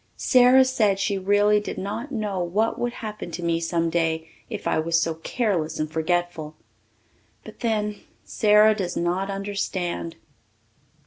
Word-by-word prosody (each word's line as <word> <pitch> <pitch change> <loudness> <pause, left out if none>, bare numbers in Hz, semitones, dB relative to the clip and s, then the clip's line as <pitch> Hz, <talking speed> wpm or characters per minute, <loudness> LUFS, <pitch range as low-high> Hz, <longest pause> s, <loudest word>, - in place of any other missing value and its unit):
Sara 255 +1 +5
said 215 -7 +2
she 200 0 -1
really 205 +2 +3
did 210 - -6
not 210 +7 -5
know 210 -6 -2
what 195 +6 0
would 240 - -1
happen 215 -6 -7
to 175 +1 -6
me 170 -1 +1
some 165 0 -1
day 160 -1 0 0.2
if 215 -3 -6
I - - +1
was 165 +1 +1
so 165 0 0
careless 170 -1 -2
and 155 0 -2
forgetful. 160 -1 -2 0.9
But 220 - -12
then, 210 -3 -1 0.2
Sara 210 0 +4
does 185 -4 -3
not 180 +3 -1
understand. 195 -4 -3
195 Hz, 145 wpm, -24 LUFS, 170-215 Hz, 0.9 s, Sara